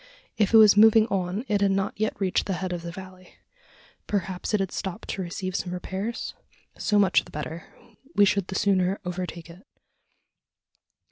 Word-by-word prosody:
If 210 Hz, -3 st, +1 dB
it 225 Hz, -, +7 dB
was 215 Hz, -2 st, +8 dB
moving 220 Hz, +1 st, +7 dB
on, 190 Hz, +4 st, -2 dB
it 205 Hz, -1 st, 0 dB
had 200 Hz, -, +3 dB
not 195 Hz, +1 st, 0 dB
yet 215 Hz, +1 st, -2 dB
reached 190 Hz, -2 st, 0 dB
the 195 Hz, -, -1 dB
head 185 Hz, 0 st, -3 dB
of 175 Hz, -, -4 dB
the 170 Hz, 0 st, -6 dB
valley. 185 Hz, 0 st, -12 dB, 0.7 s
Perhaps 190 Hz, -3 st, -2 dB
it 210 Hz, -, +2 dB
had 195 Hz, -2 st, -2 dB
stopped 190 Hz, +3 st, -5 dB
to 195 Hz, -, -3 dB
receive 185 Hz, +1 st, -4 dB
some 180 Hz, -, -2 dB
repairs? 195 Hz, +5 st, -4 dB, 0.4 s
So 210 Hz, -, 0 dB
much 195 Hz, -3 st, +4 dB
the -, -, -16 dB
better: 160 Hz, +4 st, -6 dB, 0.5 s
we 205 Hz, -, +6 dB
should 200 Hz, -1 st, +1 dB
the 190 Hz, -, -6 dB
sooner 190 Hz, -1 st, +2 dB
overtake 180 Hz, -2 st, -5 dB
it. 175 Hz, +4 st, -14 dB
190 Hz, 180 wpm, -25 LUFS, 180-205 Hz, 0.7 s, was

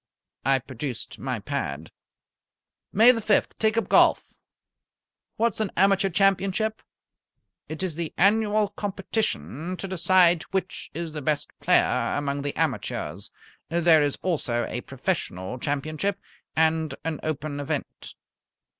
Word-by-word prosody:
I 135 Hz, +1 st, +4 dB
produced 130 Hz, 0 st, -6 dB
my -, -, -2 dB
pad. 70 Hz, +3 st, -4 dB, 1.0 s
"May 225 Hz, +5 st, +7 dB
the 230 Hz, -2 st, -2 dB
fifth, 210 Hz, -1 st, +2 dB
take 220 Hz, 0 st, +2 dB
up 230 Hz, -, +1 dB
golf. -, -, +3 dB, 1.0 s
What's 230 Hz, -2 st, +1 dB
an 215 Hz, -3 st, 0 dB
Amateur 195 Hz, +1 st, +4 dB
Championship?" 195 Hz, +3 st, +1 dB, 0.9 s
"It 155 Hz, +3 st, -4 dB
is 185 Hz, -3 st, -1 dB
the 165 Hz, 0 st, -4 dB
annual 210 Hz, +2 st, +3 dB
competition 185 Hz, -, -3 dB
to 195 Hz, -, -5 dB
decide 180 Hz, -2 st, +4 dB
which 190 Hz, -1 st, -3 dB
is 165 Hz, 0 st, -4 dB
the 150 Hz, -, -4 dB
best 150 Hz, +1 st, -1 dB
player -, -, +2 dB
among 140 Hz, 0 st, -2 dB
the 145 Hz, 0 st, -3 dB
amateurs. -, -, -2 dB, 0.4 s
There 165 Hz, -1 st, +5 dB
is 145 Hz, -1 st, 0 dB
also 135 Hz, -10 st, 0 dB
a -, -, -3 dB
Professional 95 Hz, +7 st, -3 dB
Championship, 155 Hz, +9 st, -2 dB, 0.4 s
and 160 Hz, 0 st, +2 dB
an 160 Hz, -2 st, -2 dB
Open 150 Hz, -1 st, -3 dB
event." 145 Hz, -, -5 dB
170 Hz, 125 wpm, -25 LUFS, 145-195 Hz, 1.0 s, May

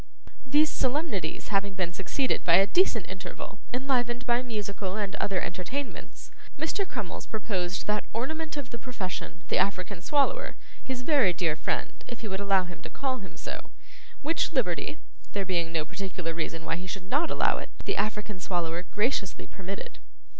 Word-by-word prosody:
These 300 Hz, +4 st, +5 dB
solemnities 255 Hz, -, 0 dB
having 200 Hz, -1 st, +2 dB
been 180 Hz, -2 st, 0 dB
succeeded 200 Hz, +8 st, +1 dB
by 170 Hz, -, +7 dB
a 195 Hz, +2 st, +8 dB
decent 230 Hz, -, +4 dB
interval, 190 Hz, +2 st, -6 dB
enlivened 245 Hz, -1 st, +1 dB
by 240 Hz, 0 st, +4 dB
musical 205 Hz, -5 st, -2 dB
and 205 Hz, -2 st, -1 dB
other 195 Hz, -2 st, +1 dB
entertainments, 250 Hz, +13 st, -4 dB, 0.3 s
Mr. 325 Hz, +6 st, 0 dB
Crummles 215 Hz, -, -4 dB
proposed 195 Hz, -4 st, -1 dB
that 210 Hz, 0 st, +1 dB
ornament 310 Hz, +7 st, -2 dB
of 275 Hz, -4 st, -4 dB
the 235 Hz, -, -4 dB
profession, 185 Hz, -7 st, -4 dB
the -, -, +4 dB
African 190 Hz, -1 st, +1 dB
Swallower, -, -, +2 dB, 0.3 s
his 255 Hz, -1 st, -3 dB
very 260 Hz, -, +5 dB
dear 165 Hz, -3 st, +2 dB
friend, -, -, -2 dB
if 240 Hz, -, -6 dB
he 225 Hz, -, -3 dB
would 190 Hz, -1 st, -2 dB
allow 195 Hz, -2 st, +4 dB
him 175 Hz, -1 st, -8 dB
to -, -, -7 dB
call 260 Hz, -2 st, -1 dB
him 195 Hz, -, -10 dB
so; -, -, -5 dB, 0.5 s
which 325 Hz, +3 st, +2 dB
liberty 210 Hz, -, +1 dB, 0.4 s
(there 200 Hz, -1 st, 0 dB
being 170 Hz, -3 st, +1 dB
no 160 Hz, -2 st, +1 dB
particular 185 Hz, -3 st, -3 dB
reason 165 Hz, 0 st, -2 dB
why 165 Hz, +1 st, +1 dB
he 180 Hz, +1 st, -5 dB
should 185 Hz, +1 st, -4 dB
not 290 Hz, +9 st, +3 dB
allow -, -, +3 dB
it) -, -, -6 dB, 0.2 s
the -, -, +1 dB
African 210 Hz, -1 st, -1 dB
Swallower 175 Hz, -2 st, 0 dB
graciously 210 Hz, -3 st, +1 dB
permitted. 195 Hz, -, -6 dB
200 Hz, 170 wpm, -29 LUFS, 185-255 Hz, 0.5 s, a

